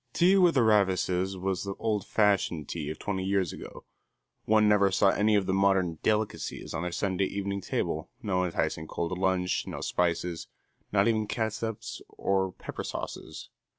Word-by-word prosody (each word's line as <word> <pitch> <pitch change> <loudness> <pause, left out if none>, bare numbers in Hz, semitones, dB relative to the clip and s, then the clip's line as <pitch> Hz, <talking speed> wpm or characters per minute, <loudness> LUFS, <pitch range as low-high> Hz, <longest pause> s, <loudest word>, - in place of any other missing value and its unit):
Tea 180 +3 +5
with 180 -4 +5
the 130 - +5
Ravises 95 -3 +2
was 95 0 -2
the 100 -1 -4
old 105 -3 -1
fashioned 100 -7 +1
tea 75 -3 -4
of 80 - -5
twenty 95 -2 -3
years 95 -3 0
ago. - - -10 0.6
One 110 0 +4
never 100 -1 +5
saw 95 +1 +4
any 105 +2 +3
of 100 -2 +2
the 95 - 0
modern 95 -4 +2
"delicacies" 110 0 -1
on 80 - -2
their 90 0 -3
Sunday 95 +1 0
evening 100 0 -3
table, 80 -3 -2
no 95 -7 0
enticing 80 -2 -2
cold 85 +2 -3
lunch, 95 -1 0
no - - -5
spices, 85 -1 -1 0.4
not 100 +1 +3
even 110 -2 +1
catsups 110 -1 -3 0.2
or 95 -1 +1
pepper - - -7
sauces. - - -6
95 Hz, 165 wpm, -28 LUFS, 90-105 Hz, 0.6 s, Tea